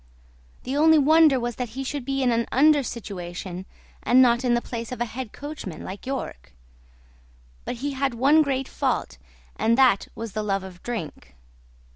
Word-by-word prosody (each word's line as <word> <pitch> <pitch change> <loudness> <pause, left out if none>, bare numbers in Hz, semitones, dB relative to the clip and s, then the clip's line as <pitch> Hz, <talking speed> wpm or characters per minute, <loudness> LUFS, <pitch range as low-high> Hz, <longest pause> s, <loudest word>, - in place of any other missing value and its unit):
The 260 +2 -3
only 315 +2 +5
wonder 305 -1 +5
was 240 -1 -4
that 250 -2 -3
he 270 - -2
should 270 -1 -4
be 270 0 -1
in 250 - +3
an 230 0 0
under 295 +3 +5
situation 185 -5 -6 0.3
and 250 - +4
not 240 -1 +4
in 245 -1 +2
the - - +2
place 235 -1 -6
of 250 - -5
a 240 - 0
head 240 -1 -7
coachman 285 - -7
like 195 +6 -8
York; 60 - -5 1.1
but - - -3
he 285 - -1
had 270 -2 -1
one 280 +6 +5
great 270 -3 -1
fault - - -2 0.4
and 230 +2 +2
that 255 -7 +4
was 225 -1 -6
the 215 - -3
love 195 -2 -1
of 185 -2 -11
drink. 155 - -6
245 Hz, 180 wpm, -24 LUFS, 210-270 Hz, 1.1 s, only